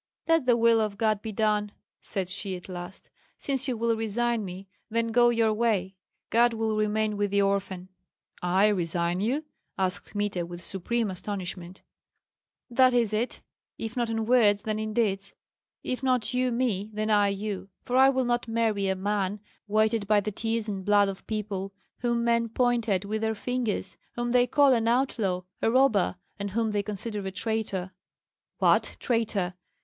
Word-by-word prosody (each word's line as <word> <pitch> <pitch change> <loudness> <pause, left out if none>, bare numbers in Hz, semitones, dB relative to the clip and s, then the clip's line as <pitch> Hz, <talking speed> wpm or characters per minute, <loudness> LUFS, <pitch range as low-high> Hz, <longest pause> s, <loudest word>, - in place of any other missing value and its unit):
"Let 330 -5 +3
the 240 -1 +5
will 230 -1 +4
of 210 -2 -2
God 215 -1 +1
be 220 - -5
done," 210 -1 +1 0.3
said 190 -2 -4
she 190 +1 -3
at 180 - -10
last; 180 0 -8 0.3
"since 270 -1 0
you 250 -3 -1
will 230 0 +1
resign 225 +1 0
me, 190 +1 -8 0.2
then 230 +1 0
go 240 +1 +5
your 230 -2 +2
way. 210 -4 0 0.4
God 235 0 +4
will 220 -1 0
remain 215 0 0
with 205 0 0
the 200 0 +2
orphan." 195 -2 -1 0.5
"I 185 +4 +3
resign 175 -2 0
you?" 260 +10 -1 0.3
asked 190 +1 -2
Kmita, 205 -4 -1
with 175 0 -8
supreme 210 +4 -1
astonishment. 185 -1 -6 0.8
"That 255 0 +4
is 230 -3 +2
it! 230 +4 -1 0.4
if 225 0 -5
not 240 -2 0
in 225 -1 -1
words, 215 -4 +4
then 215 -1 -2
in 215 0 -3
deeds; 200 -3 -1 0.5
if 255 - -3
not 255 -3 +1
you 250 0 +1
me, 230 -5 -1
then 215 +1 -1
I 205 -1 +4
you. 200 0 -4 0.2
For 250 - -2
I 265 +1 +7
will 260 -1 +1
not 240 0 0
marry 225 -3 0
a 190 - +1
man 200 +1 -1 0.3
weighted 215 0 +2
by 210 0 +5
the 210 +1 -3
tears 225 +1 -1
and 195 -2 -4
blood 205 0 +4
of 195 - -8
people, 200 -3 -3 0.3
whom 235 -1 0
men 235 0 +2
point 240 -1 +1
at 195 -1 +1
with 215 +2 -2
their 220 0 0
fingers, 245 -1 -2 0.2
whom 240 0 -2
they 250 0 +4
call 280 +1 +5
an 230 -2 +1
outlaw, 230 -7 +1 0.2
a - - +3
robber, 235 -7 +3 0.2
and 200 0 -3
whom 220 +2 0
they 205 -1 +1
consider 210 +1 -4
a - - -3
traitor." 195 -2 -2 0.7
"What, - - +2
traitor! 215 -7 0
215 Hz, 175 wpm, -27 LUFS, 200-235 Hz, 0.8 s, I